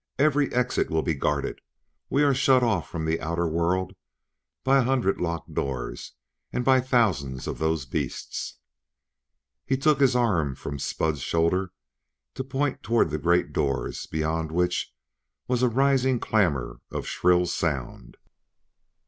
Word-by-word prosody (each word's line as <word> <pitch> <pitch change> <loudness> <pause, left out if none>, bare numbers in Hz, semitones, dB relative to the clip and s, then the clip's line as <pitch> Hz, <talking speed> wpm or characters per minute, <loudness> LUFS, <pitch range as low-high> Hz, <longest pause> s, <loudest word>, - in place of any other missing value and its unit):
Every 145 0 +3
exit 125 0 0
will 80 0 0
be 80 - 0
guarded; 70 0 -2 0.5
we 145 - +3
are 140 -1 +4
shut 130 -1 +4
off 105 -9 0
from 80 -1 -4
the 80 +1 0
outer 85 +1 -1
world 85 +3 0 0.7
by 135 +1 +4
a - - +3
hundred 125 -5 +1
locked 85 -2 -3
doors 65 -3 -4 0.4
and 125 - -2
by 130 -1 +5
thousands 95 - +1
of - - -4
those 80 -3 0
beasts." - - -4 1.1
He 135 - 0
took 145 +1 +3
his 135 -3 +4
arm 90 - +1
from 70 +2 -6
Spud's 75 +1 -1
shoulder 85 +5 +1 0.6
to 130 - -4
point 135 +1 -2
toward 115 -8 +2
the 75 - -2
great 85 +3 +2
doors, 70 -1 -2
beyond 80 0 -2
which 90 +1 0 0.6
was 125 -1 0
a 125 - +4
rising 130 0 +2
clamor 85 - 0
of - - -4
shrill 90 0 +2
sound. 75 -7 -3
90 Hz, 145 wpm, -26 LUFS, 80-125 Hz, 1.1 s, by